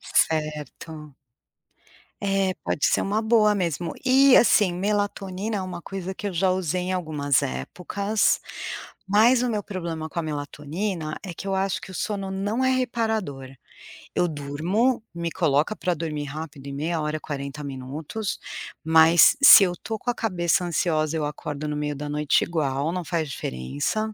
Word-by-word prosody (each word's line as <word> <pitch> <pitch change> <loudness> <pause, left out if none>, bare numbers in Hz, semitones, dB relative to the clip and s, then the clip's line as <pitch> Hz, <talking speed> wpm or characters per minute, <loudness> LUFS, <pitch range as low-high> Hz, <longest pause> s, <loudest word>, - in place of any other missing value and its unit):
Certo. 150 -1 -2 1.1
É, 195 -1 +1
pode - - +1
ser - - +2
uma 210 +3 0
boa 220 -2 +4
mesmo. 170 -3 -2
E, 265 +1 +6
assim, 205 -6 +5
melatonina 205 +1 -2
é - - -2
uma 180 -2 -6
coisa 190 0 -5
que 205 - -6
eu - - -5
já 185 +2 +2
usei 185 -1 -1
em 185 +1 -2
algumas 150 -6 0
épocas, 185 - -1 0.7
mas 230 +5 +5
o 250 - 0
meu 210 -2 -1
problema 170 -5 -5
com 170 - -6
a - - 0
melatonina 155 +3 -4
é 180 -3 -6
que 195 - -8
eu 195 - 0
acho 190 0 0
que 190 - -10
o - - -9
sono 195 0 -3
não 205 +6 -1
é 260 - +3
reparador, 220 - -1 0.7
eu 175 - +2
durmo, 170 - 0
me 170 0 -3
coloca 155 +4 +1
pra 180 -3 -1
dormir 150 -2 -4
rápido, 150 0 -8
em 140 - -5
meia 160 +3 -2
hora, 155 0 -2
40 140 0 -6
minutos, 140 +10 -5 0.4
mas 160 - +6
se 215 - +11
eu 180 -2 +1
tô 220 -1 -4
com 245 - -4
a 240 - +1
cabeça 180 -5 0
ansiosa, 160 -2 0
eu 155 -2 -1
acordo 150 0 -5
no 150 - -2
meio 150 0 -2
da 145 +1 -5
noite 150 0 +2
igual, 150 -2 -1
não 180 0 -3
faz 160 -3 -2
diferença. 75 - -3
170 Hz, 165 wpm, -24 LUFS, 150-200 Hz, 1.1 s, se